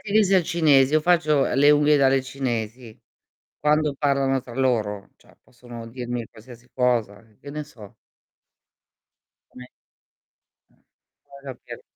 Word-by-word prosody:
al 200 -3 +2
cinese. 150 -5 +3
Io 155 - +4
faccio, 155 -3 +2
uhm, - - -1
le 145 +3 +5
unghie 150 0 +4
dalle 135 -1 +2
cinesi. 120 -3 -5 0.6
Quando 150 0 +1
parlano 135 -2 0
tra 120 -2 -12
loro, 110 -6 -1
cioè - - -24
possono 120 -1 -12
dirmi 120 -1 -6
qualsiasi 120 +2 -16
cosa, 120 -6 0
e 105 - -29
che 140 - -11
ne 150 0 -5
so. 110 -9 -15 1.6
Come 125 - -13 1.1
eh, - - -32 0.7
va 135 - -6
a - - -8
capire. - - -12
130 Hz, 135 wpm, -23 LUFS, 120-150 Hz, 1.6 s, le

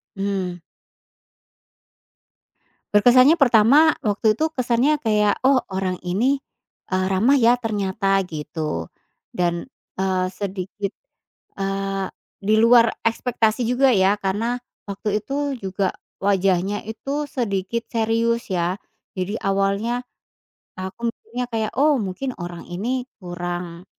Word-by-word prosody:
Mhm. 190 -3 -2 2.3
Berkesannya 255 +9 +6
pertama 275 +5 +6
waktu 215 0 +2
itu 315 +5 0
kesannya 255 +3 +1
kayak, 210 -4 +2
oh 270 -1 +5
orang 190 -1 -1
ini, 245 +10 +1 0.5
eee, 185 0 +1
ramah, 225 +9 +3
ya, 240 +1 +5
ternyata 200 -3 0
gitu 150 - -4 0.4
dan, 175 -1 -1 0.3
eee, 190 -1 0
sedikit, 195 0 -4 0.7
eee, 195 0 -2 0.3
di 205 +2 0
luar 230 0 +6
ekspektasi 230 0 +1
juga, 250 +3 +3
ya, 195 -4 +4
karena 225 +6 -1 0.2
waktu 205 +1 -2
itu 280 -1 -2
juga 195 -2 -1 0.3
wajahnya 195 0 +1
itu 275 +7 -3
sedikit 230 -4 -2
serius, 230 +1 +1
ya, 180 +2 0 0.4
jadi 190 +4 -3
awalnya 200 +5 0 0.7
aku 190 +5 -6
mikirnya 245 +2 -5
kayak 220 -1 -1
oh 285 -3 +4
mungkin 225 +7 -4
orang 175 -1 -7
ini 245 +8 -3 0.2
kurang, 175 0 -5
205 Hz, 110 wpm, -22 LUFS, 190-245 Hz, 2.3 s, Berkesannya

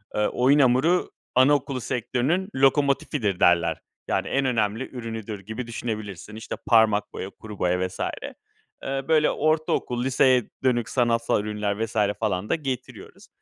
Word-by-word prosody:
Eee, 105 0 +2
oyun 135 +4 +3
hamuru, 135 +7 +3 0.2
anaokulu 135 0 +3
sektörünün 130 - -1
lokomotifidir 135 - +2
derler. 85 -2 +3 0.3
Yani, - - -1
en 135 0 0
önemli 115 -1 0
ürünüdür 115 -4 -6
gibi 110 +5 -6
düşünebilirsin. 110 -3 -6
İşte, 110 - -6
parmak 110 -3 +3
boya, 95 - -5
kuru 105 0 -11
boya 90 +1 +1
vs. 90 - -13 0.8
Eee, 135 0 -2
böyle, 155 -2 +4
ortaokul, 155 -5 0
liseye 130 -2 +3
dönük 120 -4 +1
sanatsal 115 -4 +1
ürünler 105 +1 -2
vs. 115 - -13 0.2
falan 105 -2 -1
da - - +3
getiriyoruz. 135 -5 -7
120 Hz, 135 wpm, -25 LUFS, 105-135 Hz, 0.8 s, böyle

